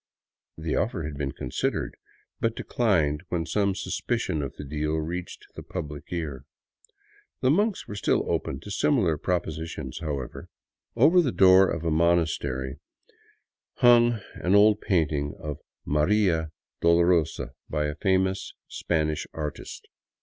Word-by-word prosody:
The 80 0 -2
offer 100 -6 -1
had 75 -1 -5
been 70 -1 -3
considered, - - -2 0.4
but 115 0 0
declined 80 -11 +1
when 85 -2 -1
some 100 +4 +1
suspicion 75 - -2
of 70 - -5
the - - -7
deal 75 +2 -2
reached 85 +3 -4
the - - -8
public 75 -5 -6
ear. 75 -7 -4 1.0
The 130 - +4
monks 205 +5 +1
were - - -6
still 100 - +1
open 65 - -2
to 105 - -9
similar 100 - +2
propositions, 80 -5 -3
however. 70 -6 -5 0.5
Over 150 +10 +6
a 150 -8 +2
door 95 -1 +6
of 85 - -3
the 85 - 0
monastery 75 -5 +1 1.0
hung 120 -2 +5
an 90 +3 +1
old 105 +1 +5
painting 75 -5 0
of 75 -2 -5 0.2
" - - -53
Maria 80 +1 +2 0.3
Dolorosa 85 -1 +3
" - - -47
by 75 -1 0
a 75 - -2
famous 95 +2 0
Spanish 75 -2 -1
artist. 75 -3 -6
85 Hz, 135 wpm, -26 LUFS, 75-100 Hz, 1.0 s, Over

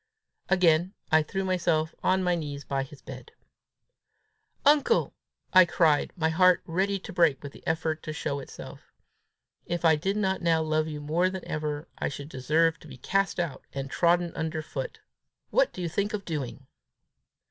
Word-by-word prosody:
Again 180 0 +3 0.2
I 160 0 +6
threw 190 +5 -3
myself 165 -4 +1
on 190 0 +2
my 180 -1 +2
knees 145 -4 -4
by 135 0 -2
his 135 +1 -10
bed. - - -10 1.3
"Uncle," 295 - +4 0.4
I 185 0 +9
cried, 160 -4 +2
my 160 -3 +1
heart 180 +2 +4
ready 190 +4 0
to 195 +1 -9
break 165 -6 +3
with 140 - -6
the - - -15
effort 160 0 -1
to 155 - -5
show 145 -2 -3
itself, 135 - -11 0.8
"if 175 0 -2
I 160 -1 +6
did 195 +7 -1
not 190 -2 0
now 165 -2 +2
love 155 0 0
you 150 -1 -5
more 165 +5 +1
than 190 -1 -6
ever, 150 +1 -3
I - - 0
should 140 0 -7
deserve 160 +5 +1
to - - -14
be 130 -3 -11
cast 195 +8 0
out, 170 -5 -3
and 135 0 -5
trodden 170 0 +2
under 160 -1 -3
foot! - - -6 0.5
What - - +3
do 180 - -6
you - - -1
think 205 +5 -1
of 200 -2 -6
doing?" 140 -4 -5
165 Hz, 175 wpm, -27 LUFS, 155-185 Hz, 1.3 s, I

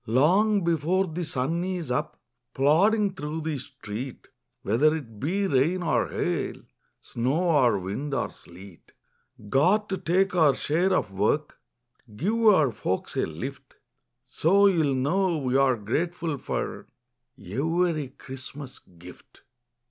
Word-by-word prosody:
Long 185 - +3
before 170 +3 +1
the 175 0 -4
sun 160 +2 -1
is 180 -7 -3
up, 125 - -2 0.4
Plodding 195 +9 +3
through 150 -1 -5
the 155 -3 -3
street, 130 -2 -8 0.3
Whether 145 +10 +3
it 115 -9 -8
be 190 - 0
rain 170 +4 +1
or 165 - +1
hail, - - -2 0.4
Snow 145 +9 -1
or 125 -8 +4
wind 100 +11 -4
or 135 - -1
sleet. 90 +1 -15 0.5
Got 185 - +2
to 190 - -2
take 190 +3 +1
our 155 -6 +4
share 170 +8 +1
of 105 - 0
work, 105 +10 -1 0.6
Give 220 - +1
our 155 - +5
folks 95 -3 -3
a - - 0
lift. - - -8 0.5
So 195 +5 +3
you'll 160 -8 +3
know 170 +7 +1
we're 135 -1 +2
grateful 155 - -2
for - - -4 0.5
Every 155 - -1
Christmas 135 +1 -9
gift. 90 0 -16
150 Hz, 125 wpm, -26 LUFS, 130-180 Hz, 0.6 s, our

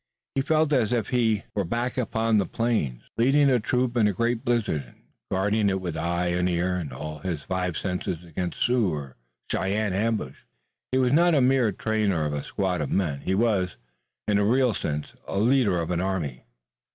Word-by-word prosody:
He 135 - +1
felt 155 +1 +2
as 120 -6 +2
if 115 -4 0
he 115 -4 +1
were 100 - 0
back 120 +7 -2
upon 115 -3 +1
the 100 - 0
plains, 110 - -1
leading 135 +4 +4
a 125 - +4
troop 125 +2 0
in 110 -3 +4
a 105 - +1
great 115 +4 0
blizzard, 115 - 0
and - - -20 0.3
guarding 100 +2 +1
it 95 0 0
with 90 -3 -4
eye 85 +2 -1
and 90 +1 +1
ear 90 +1 0
and 85 -6 -4
all 75 +4 -6
his 85 -5 -4
five 90 +1 -2
senses 90 -2 -3
against 85 +1 -4
Sioux 120 -4 +2
or 70 -4 -6 0.4
Cheyenne 100 +1 0
ambush. 105 - -2 0.5
He 130 - +2
was 130 0 +3
not 170 +2 +5
a - - +5
mere 130 -3 +3
trainer 100 -5 0
of 75 - -2
a 75 - -3
squad 90 -4 -1
of 75 - -2
men, 80 -8 0
he 95 - 0
was, 95 - +1 0.5
in 105 -1 +3
a - - +2
real 125 +2 +3
sense, 75 -5 -3
a - - -3
leader 110 -4 +3
of 85 +1 -2
an 90 0 0
army. 85 -10 -3
100 Hz, 200 wpm, -26 LUFS, 85-120 Hz, 0.5 s, not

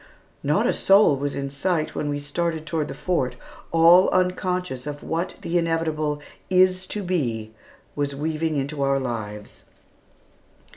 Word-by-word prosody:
Not - - +1
a - - +2
soul 195 -6 +5
was 140 +1 -3
in 140 0 -3
sight 155 +3 -1
when 150 - -2
we 145 - -1
started 160 +2 -2
toward 155 -1 -1
the - - -7
Fort, 130 -9 -1 0.4
all 170 +3 +6
unconscious 180 -6 -1
of 145 0 -6
what 165 +3 -2
the 175 +1 +1
inevitable 160 -3 -1 0.3
"is 185 0 +3
to 210 - -3
be" 120 - -2 0.4
was 145 -1 -2
weaving 155 +2 -1
into 140 +1 -3
our 135 0 +2
lives. 105 -5 -6
155 Hz, 145 wpm, -24 LUFS, 140-175 Hz, 0.4 s, all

